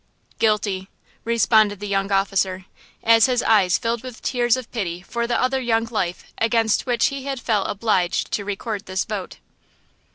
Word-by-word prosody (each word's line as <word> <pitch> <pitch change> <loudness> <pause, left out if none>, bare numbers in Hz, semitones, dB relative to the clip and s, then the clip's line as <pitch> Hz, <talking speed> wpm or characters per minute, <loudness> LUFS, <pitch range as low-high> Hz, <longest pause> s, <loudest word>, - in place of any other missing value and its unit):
"Guilty," 205 -3 0 0.3
responded 220 -3 +3
the 205 - -5
young 195 0 -1
officer, 195 -1 0 0.4
as 225 +1 +6
his 250 -2 +1
eyes 195 -5 +4
filled 230 0 -2
with 255 -2 -9
tears 240 -1 +2
of 255 -3 -8
pity 180 -6 -4
for 235 +3 -3
the 240 - 0
other 260 +1 +1
young 230 -2 +1
life 190 -6 -3
against 225 0 +1
which 245 +4 +2
he 275 -1 -6
had 275 -2 -3
felt 215 -4 0
obliged 195 -4 0
to 205 - -1
record 205 +1 -4
this 185 0 -1
vote. 205 -4 -5
220 Hz, 165 wpm, -22 LUFS, 195-235 Hz, 0.4 s, as